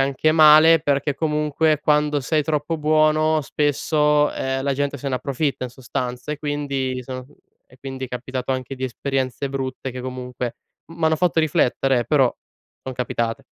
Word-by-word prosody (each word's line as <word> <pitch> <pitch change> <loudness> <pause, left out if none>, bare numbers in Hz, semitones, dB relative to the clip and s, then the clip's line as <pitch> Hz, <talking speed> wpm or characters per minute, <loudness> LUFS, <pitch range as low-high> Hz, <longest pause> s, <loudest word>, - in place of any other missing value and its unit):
anche 140 +3 +2
male, 155 +1 +7
perché 145 -1 0
comunque 150 0 +1
quando 150 -1 +2
sei 150 +4 0
troppo 155 +2 -1
buono 155 +1 +3
spesso, 150 +1 +1
ehm, 130 0 -2
la 140 -1 0
gente 145 0 -2
se 140 - -4
ne 130 - -1
approfitta 135 +2 -2
in 125 - -6
sostanza, 125 +2 -5
e - - -4
quindi 145 -3 -2
mi 125 - -5
sono 130 0 -7 0.4
e 125 - -21
quindi 135 0 -6
è - - -18
capitato 125 +1 -5
anche 130 +1 -4
di 130 0 -4
esperienze 135 +1 -2
brutte 135 -1 -4
che 125 - -6
comunque 125 -1 -5 0.3
m 165 - -13
m'hanno 160 -1 +2
fatto 175 0 +1
riflettere, 135 -4 +2
eh, - - -3
però 135 -5 +3 0.5
son 130 - -5
capitate. 115 -2 -2
140 Hz, 170 wpm, -22 LUFS, 130-150 Hz, 0.5 s, male